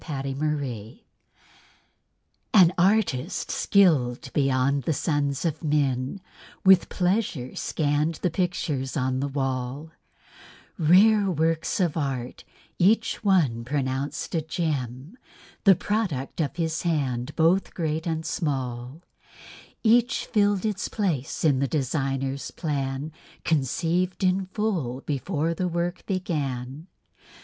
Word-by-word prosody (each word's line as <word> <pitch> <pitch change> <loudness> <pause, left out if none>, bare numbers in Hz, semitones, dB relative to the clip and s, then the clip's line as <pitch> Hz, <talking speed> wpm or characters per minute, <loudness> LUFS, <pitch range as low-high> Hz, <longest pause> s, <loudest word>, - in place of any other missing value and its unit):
PERFECT 135 -3 -4
WORK 135 -8 -3 1.6
An 180 -4 +7
artist 185 -4 +1
skilled 150 -12 +2
beyond 135 0 +2
the 160 - +1
sons 145 -1 -1
of 160 -1 -2
men 140 +2 0 0.4
With 190 -2 +6
pleasure 180 - -1
scanned 150 +1 0
the 175 - -1
pictures 155 -7 -2
on 130 -1 0
the 140 - -1
wall, 135 +2 -3 0.9
Rare 195 +5 +5
works 165 +1 0
of 175 -5 +1
art, 130 -5 -3 0.4
each 225 +5 +2
one 155 - +2
pronounced 135 +1 -2
a 165 - +1
gem, 155 - -3 0.5
The 195 -2 +8
product 175 - -2
of 145 - -2
his 160 -2 -1
hand, 140 -6 -1
both 170 +4 +2
great 160 -1 -2
and 160 -1 -2
small; 130 -1 -3 0.8
Each 240 +3 +3
filled 205 -3 +1
its 210 -2 -1
place 170 - -2
in 145 -5 +3
the 140 - +1
designer's 135 0 -2
plan; 140 -2 -3 0.3
Conceived 165 +6 0
in 185 +1 +2
full 180 - -2
before 155 +3 -1
the 180 +2 -1
work 175 +1 -2
began. 145 -6 -3
155 Hz, 110 wpm, -25 LUFS, 135-180 Hz, 1.6 s, The